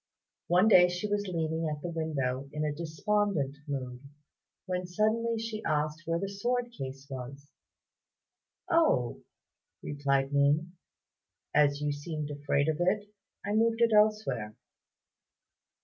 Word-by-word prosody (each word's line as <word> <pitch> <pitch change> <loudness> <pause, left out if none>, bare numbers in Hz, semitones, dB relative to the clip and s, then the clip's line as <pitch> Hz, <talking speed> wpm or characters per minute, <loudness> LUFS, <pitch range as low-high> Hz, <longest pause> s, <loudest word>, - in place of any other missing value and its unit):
One 180 +4 +4
day 180 -4 +7
she 175 +3 -3
was 205 0 -1
leaning 160 -2 -1
at 150 -1 -5
the 175 - -3
window 140 -5 -2
in 150 0 -2
a 150 - -1
despondent 165 -1 -1
mood, 130 -3 -4 0.7
when 180 -1 -2
suddenly 220 +5 +1
she 220 -1 -4
asked 155 +2 -1
where 165 0 +1
the 195 +3 -2
sword 240 +5 -1
case 135 - -7
was. 135 +1 -8 1.2
"Oh," 325 - +2 0.6
replied 140 -1 0
Ning, 145 +4 +3 0.8
"as 145 -1 +3
you 150 0 0
seemed 150 0 -4
afraid 145 0 0
of 155 -1 +1
it, 205 +4 0 0.3
I 205 - -1
moved 225 +1 +2
it 230 -1 +4
elsewhere." 210 - +2
160 Hz, 130 wpm, -30 LUFS, 145-205 Hz, 1.2 s, day